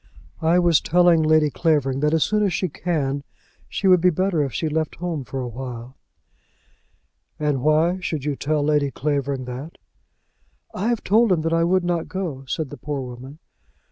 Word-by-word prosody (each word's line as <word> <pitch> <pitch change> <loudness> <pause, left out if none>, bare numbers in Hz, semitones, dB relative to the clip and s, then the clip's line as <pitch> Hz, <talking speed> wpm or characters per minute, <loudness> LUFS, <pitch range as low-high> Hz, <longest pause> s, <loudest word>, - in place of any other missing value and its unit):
"I 165 +2 +3
was 175 -3 +4
telling 175 -1 +4
Lady 155 -1 +3
Clavering 135 -2 +1
that 150 +1 +1
as 160 -1 +3
soon 210 0 +1
as 200 -2 +2
she 180 +1 -1
can, 145 -4 -2 0.5
she - - -4
would 180 -2 +6
be 180 - +5
better 180 -1 0
if 135 - -3
she 160 - -2
left 155 0 -2
home 165 -5 -4
for 130 +3 -6
awhile." 125 0 -7 1.4
"And 150 -3 0
why 155 +5 +2
should 160 -5 -4
you 145 -2 -1
tell 150 +1 -1
Lady 145 -1 +2
Clavering 140 -2 -2
that?" 130 +6 -7 1.0
"I 205 - -2
have 235 -2 0
told 220 +2 +3
him 170 -3 +2
that 165 +1 -1
I 165 0 +3
would 185 +2 +2
not 175 -2 -1
go," 165 -8 -5
said 150 +1 -3
the 145 - -8
poor 145 -2 -4
woman. 130 +3 -9
155 Hz, 180 wpm, -22 LUFS, 140-175 Hz, 1.4 s, would